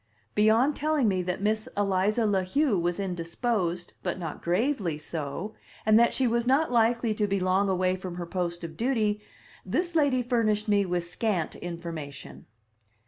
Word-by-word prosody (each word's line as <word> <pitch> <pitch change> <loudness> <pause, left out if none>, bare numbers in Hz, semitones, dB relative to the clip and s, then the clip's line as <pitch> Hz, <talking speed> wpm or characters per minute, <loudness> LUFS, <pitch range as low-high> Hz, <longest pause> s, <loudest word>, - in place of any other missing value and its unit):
Beyond 225 +7 +4
telling 300 -4 +1
me 190 -3 +1
that 180 +2 -3
Miss 215 +1 0
Eliza 205 +3 +2
La 200 -3 +2
Heu 260 +6 +1
was 175 +2 -1
indisposed, 180 0 -2
but 180 -1 -2
not 165 -4 -6
gravely 180 - 0
so, 155 +6 -5 0.3
and 215 +1 +6
that 235 - +5
she 265 - 0
was 235 0 +1
not 275 +3 +3
likely 235 -1 +2
to 210 -1 0
be 200 0 0
long 185 +2 +2
away 185 0 +1
from 185 -1 -6
her 175 -1 -4
post 175 -1 -3
of 165 -1 -6
duty, 220 -3 0 0.4
this 340 - -1
lady 285 -6 +3
furnished 225 -3 +1
me 200 -2 +3
with 175 -1 0
scant 175 -1 -2
information. 165 -5 -7
200 Hz, 165 wpm, -27 LUFS, 175-235 Hz, 0.4 s, and